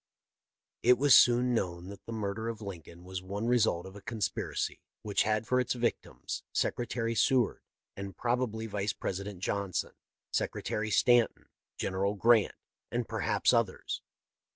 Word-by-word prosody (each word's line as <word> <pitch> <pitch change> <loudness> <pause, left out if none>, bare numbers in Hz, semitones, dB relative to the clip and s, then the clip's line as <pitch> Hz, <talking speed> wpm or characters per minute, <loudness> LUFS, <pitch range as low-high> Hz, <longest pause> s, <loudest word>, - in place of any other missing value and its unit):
" - - -62 0.3
It 125 +1 +6
was 140 +1 +6
soon 125 +1 +6
known 90 -4 -2
that 100 0 -11
the - - -5
murder 110 0 -3
of 115 -2 -5
Lincoln 90 -4 -9
was 95 0 -5
one 100 +4 -4
result 115 -8 +2
of 95 +1 -10
a 100 - -10
conspiracy 110 -1 -3 0.2
which 105 -2 +1
had 110 0 +1
for 125 +3 +2
its 125 - 0
victims 120 -1 -3
Secretary 115 -1 -1
Seward 125 +1 +2 0.3
and 100 0 -7
probably 120 -2 -1
Vice 100 -2 -2
Presi 100 +1 -4
dent 100 -3 -8
Johnson, 100 -1 -2 0.4
Secretary 110 0 -1
Stanton, 120 +2 +3 0.3
General 100 +2 -1
Grant, 115 +1 +4 0.3
and 120 -1 -2
perhaps 110 0 +1
others. 115 -5 0
110 Hz, 150 wpm, -31 LUFS, 100-120 Hz, 0.4 s, It